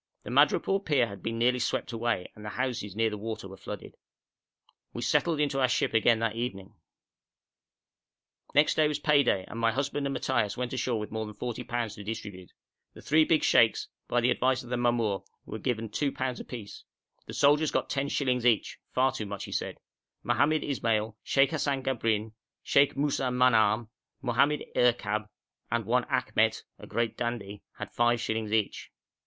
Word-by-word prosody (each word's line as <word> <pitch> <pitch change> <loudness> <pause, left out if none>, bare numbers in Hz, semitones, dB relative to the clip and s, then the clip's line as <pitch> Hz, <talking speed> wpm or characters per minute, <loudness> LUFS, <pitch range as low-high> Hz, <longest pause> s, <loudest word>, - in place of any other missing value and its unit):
The - - -7
madrepore 195 0 +3
pier 140 -8 +3
had 100 -3 -9
been 115 0 -3
nearly 125 +2 +2
swept 120 - -1
away, 115 -5 -2
and 105 - -12
the 105 - -5
houses 120 -6 -3
near 110 0 +1
the 105 - -5
water 110 -2 -5
were 95 - -10
flooded. - - -8 1.0
We - - -4
settled 165 -3 +2
into 140 -2 +1
our 130 - +5
ship 125 - 0
again 115 +1 +4
that 115 -1 0
evening. 110 -4 -4 1.8
Next 145 +2 +5
day 155 -1 +3
was 150 -1 -1
pay 150 -1 +4
day, 95 -8 +1
and 115 - -7
my 115 0 +3
husband 140 +3 -1
and 140 - -3
Matthaios 105 -5 0
went 125 0 -3
ashore 125 -2 -1
with 105 - -6
more 110 0 -3
than 105 - -9
40_l_. 120 -1 -3
to 105 - -9
distribute. 100 -4 -7 0.4
The - - -12
three 155 +2 +4
big 160 -1 +2
sheikhs, 115 -2 +4 0.2
by 120 - +1
the 120 - +3
advice 130 0 +1
of 120 - -11
the - - +1
mamour, 120 -5 +1 0.3
were - - -6
given 115 -2 -2
2_l_. 130 +2 -2
apiece; 115 -5 -8 0.4
the - - -7
soldiers 145 +2 +4
got - - -1
ten 140 0 -1
shillings 125 -4 0
each 120 -3 +2 0.2
far 130 +1 +4
too 110 -5 -5
much, 100 0 -5
he - - -8
said; - - -3 0.5
Mohammed 155 +2 +2
Ismail, 115 -5 -1
Sheikh 135 0 +3
Hassan 140 -4 -1
Gabrin, 110 -4 0 0.3
Sheikh 140 0 +3
Moussa 140 -2 0
Manahm, 115 -3 +3 0.3
Mohammed 135 +4 +2
Erkab, 110 -3 +1 0.4
and - - 0
one - - +2
Akhmet, - - +1 0.2
a - - -11
great 115 -1 -1
dandy, 110 -4 -4 0.2
had - - -6
five 120 0 +2
shillings 110 -2 -2
each. 110 -2 -1
120 Hz, 180 wpm, -29 LUFS, 110-135 Hz, 1.8 s, our